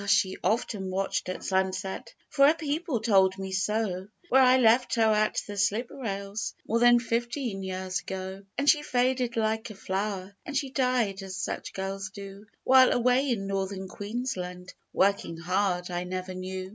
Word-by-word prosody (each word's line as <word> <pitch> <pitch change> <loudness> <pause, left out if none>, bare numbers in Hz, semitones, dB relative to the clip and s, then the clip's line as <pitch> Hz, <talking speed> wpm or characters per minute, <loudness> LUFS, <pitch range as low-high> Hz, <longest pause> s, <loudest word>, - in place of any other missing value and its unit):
she 190 -2 +3
often 210 -3 -1
watched 190 0 -2
at 185 - -5
sunset 190 +4 -2 0.2
For 275 -1 +5
her 310 - +5
people 305 -5 -2
told 190 -4 +4
me 190 0 -5
so 190 -1 -1 0.2
Where 265 - +6
I 255 0 +6
left 245 0 +4
her 230 - +3
at 215 0 +1
the 205 - -7
slip 210 +4 0
rails 200 -3 -4
More 230 - +1
than 240 0 +7
fifteen 235 -2 -2
years 185 0 -3
ago. 190 0 -6 0.2
And 280 - -1
she 295 0 +6
faded 250 -3 0
like 220 0 0
a 215 - -9
flower, 195 0 -3
And 280 - -3
she 275 -2 -2
died, 250 -7 +1
as 190 -1 -7
such - - -4
girls 195 +1 -4
do, 200 +1 -10 0.2
While, 260 0 +6
away 250 +3 +2
in 215 -5 -1
Northern 195 -1 -3
Queensland, 185 -4 -5 0.2
Working 195 -4 +1
hard, 180 +1 -1
I 175 0 -2
never 185 +1 -5
knew. 185 0 -5
200 Hz, 170 wpm, -28 LUFS, 190-240 Hz, 0.2 s, than